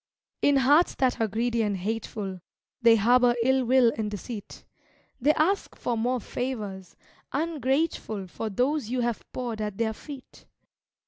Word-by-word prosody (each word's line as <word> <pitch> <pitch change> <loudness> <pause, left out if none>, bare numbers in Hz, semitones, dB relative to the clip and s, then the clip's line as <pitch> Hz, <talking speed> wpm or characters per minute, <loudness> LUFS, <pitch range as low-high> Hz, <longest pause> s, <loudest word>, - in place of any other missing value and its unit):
In 285 - +4
hearts 285 +6 +4
that 255 -3 +1
are 225 - +3
greedy 230 +2 0
and 205 -3 0
hateful, 200 -1 -4 0.4
They 230 -1 +7
harbor 240 +3 +4
ill 265 +1 +3
will 245 -1 +4
and 215 -1 -2
deceit; 210 +1 -8 0.5
They 285 +5 +4
ask 370 +6 +1
for 240 - -2
more 245 +3 0
favors, 210 -7 -5 0.4
ungrateful 280 - -1
For 215 +4 -5
those 255 +4 0
you 250 0 0
have 235 -2 -1
poured 235 -4 -4
at 210 -2 -3
their 225 -1 0
feet. 275 +3 -11
240 Hz, 145 wpm, -27 LUFS, 215-260 Hz, 0.5 s, They